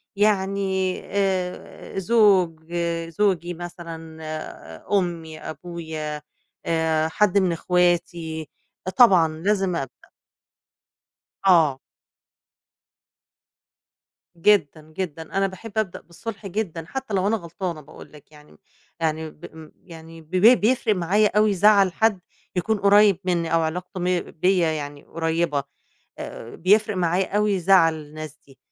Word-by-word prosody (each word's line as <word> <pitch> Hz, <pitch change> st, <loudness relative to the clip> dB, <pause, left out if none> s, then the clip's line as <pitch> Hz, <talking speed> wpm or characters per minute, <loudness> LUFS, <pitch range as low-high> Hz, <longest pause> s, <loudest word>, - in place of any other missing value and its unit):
يعني 195 Hz, -2 st, +1 dB
آآ، 190 Hz, -1 st, -3 dB
زوج، 185 Hz, -6 st, +2 dB, 0.4 s
زوجي 175 Hz, -2 st, 0 dB
مثلًا 165 Hz, -2 st, -9 dB
آآ 155 Hz, -, -8 dB
أمّي، 165 Hz, -3 st, -5 dB
أبويا 155 Hz, -2 st, -6 dB, 0.4 s
آآ، 160 Hz, -1 st, +1 dB
حد 200 Hz, +3 st, +2 dB
من 185 Hz, -3 st, +3 dB
أخواتي، 170 Hz, -2 st, 0 dB, 0.5 s
طبعًا 190 Hz, -10 st, +7 dB
لازم 190 Hz, 0 st, 0 dB
أبدأ. 135 Hz, -6 st, -7 dB, 1.4 s
آه. 160 Hz, -7 st, +5 dB, 2.6 s
جدًا، 165 Hz, -5 st, +3 dB, 0.2 s
جدًا، 165 Hz, -4 st, -4 dB, 0.2 s
أنا 195 Hz, -, +3 dB
باحب 195 Hz, +4 st, -10 dB
أبدأ 215 Hz, -5 st, -1 dB
بالصُلح 200 Hz, +5 st, -8 dB
جدًا 175 Hz, -5 st, -4 dB
حتّى 265 Hz, -3 st, -5 dB
لو 190 Hz, 0 st, +1 dB
أنا 225 Hz, +2 st, +2 dB
غلطانة 170 Hz, -2 st, -5 dB
باقول 140 Hz, -, -14 dB
لك 150 Hz, 0 st, -17 dB
يعني 150 Hz, -1 st, -17 dB
م 75 Hz, -, -20 dB, 0.4 s
يعني 160 Hz, 0 st, -1 dB
ب -, -, -13 dB
ام 160 Hz, -1 st, -12 dB
يعني 165 Hz, -1 st, -12 dB
ب 160 Hz, +2 st, -23 dB
ب 220 Hz, +7 st, +6 dB
بيفرق 225 Hz, -1 st, +2 dB
معايا 195 Hz, +4 st, +2 dB
أوي 215 Hz, -1 st, +4 dB
زعل 195 Hz, -1 st, +4 dB
حد 220 Hz, -3 st, +2 dB, 0.4 s
يكون 205 Hz, +4 st, 0 dB
قريّب 200 Hz, -1 st, +5 dB
منّي 170 Hz, -3 st, -1 dB
أو 165 Hz, -, +4 dB
علاقته 180 Hz, +3 st, -4 dB
م 180 Hz, 0 st, +1 dB
بيّا 175 Hz, -1 st, +2 dB
يعني 145 Hz, -2 st, -6 dB
قريّبة 165 Hz, -3 st, -1 dB, 0.5 s
آآ، 115 Hz, -, -8 dB
بيفرق 210 Hz, +3 st, +2 dB
معايا 180 Hz, +3 st, 0 dB
أوي 210 Hz, -3 st, +1 dB
زعل 175 Hz, -3 st, +5 dB
الناس 155 Hz, 0 st, -9 dB
دي، 135 Hz, -1 st, -19 dB
175 Hz, 120 wpm, -23 LUFS, 160-195 Hz, 2.6 s, طبعًا